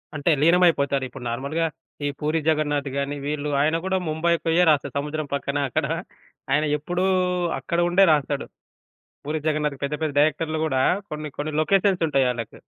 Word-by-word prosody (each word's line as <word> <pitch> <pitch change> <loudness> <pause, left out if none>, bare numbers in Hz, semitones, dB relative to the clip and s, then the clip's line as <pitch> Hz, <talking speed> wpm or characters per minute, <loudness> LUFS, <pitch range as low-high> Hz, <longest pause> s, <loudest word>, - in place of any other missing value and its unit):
అంటే 150 +3 0
లీనమైపోతారు. 160 -5 +3
ఇప్పుడు 125 0 -10
నార్మల్‌గా 140 +7 -1 0.4
ఈ - - +1
పూరీ 155 +2 0
జగన్నాథ్ 145 -2 0
గాని 140 +1 -2
వీళ్ళు 150 0 -2
ఆయన 155 +2 +2
గూడా 190 0 +1
ముంబై 165 +2 +1
పోయే 165 +2 +3
రాస్తాడు. 140 -3 +1
సముద్రం 150 +1 -4
పక్కన 140 0 -2
అక్కడ 155 +2 0 0.7
ఆయన 150 +2 +3
ఎప్పుడూ 175 +5 -2 0.5
అక్కడ 170 - -2
ఉండే 190 +2 +5
రాస్తాడు. 145 -1 -1 0.8
పూరీ 155 +2 -2
జగన్నాథ్‌‌‌కి 150 -2 -1
పెద్ద 145 +2 -2
పెద్ద 155 -2 0
డైరెక్టర్‌లు 155 +1 +1
గూడా 135 -4 +1 0.3
కొన్ని 150 -1 -5
కొన్ని 150 +1 -3
లొకేషన్స్ 190 0 +2
ఉంటాయి 135 -3 +2
ఆళ్ళకి. 115 -2 -6
150 Hz, 155 wpm, -24 LUFS, 140-160 Hz, 0.8 s, ఉండే